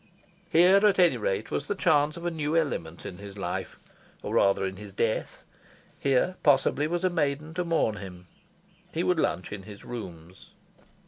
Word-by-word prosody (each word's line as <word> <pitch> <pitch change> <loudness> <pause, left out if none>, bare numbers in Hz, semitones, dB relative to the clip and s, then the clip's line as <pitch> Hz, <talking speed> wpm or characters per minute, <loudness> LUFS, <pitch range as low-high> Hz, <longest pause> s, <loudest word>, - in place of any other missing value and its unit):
Here, 185 +4 +6
at 210 -2 +5
any 180 -2 +5
rate, - - -2
was - - -2
the 205 - -1
chance 155 -5 +2
of 170 - -8
a 175 - 0
new 155 0 -1
element 85 - -2
in 90 - -7
his 100 0 -10
life, 90 -3 -4 0.5
or - - -4
rather 100 0 +3
in 95 0 -4
his 100 -1 -10
death. 110 +2 -2 0.6
Here, 140 +7 +1
possibly, 145 +1 +3
was 175 +2 -2
a 185 - +3
maiden 150 -1 -1
to 180 +2 -1
mourn 165 -11 +1
him. 90 -2 -9 0.7
He 165 - 0
would 180 -2 +1
lunch 90 - -1
in 100 -1 -6
his 100 0 -12
rooms. 90 -7 -9
145 Hz, 180 wpm, -27 LUFS, -, 0.7 s, Here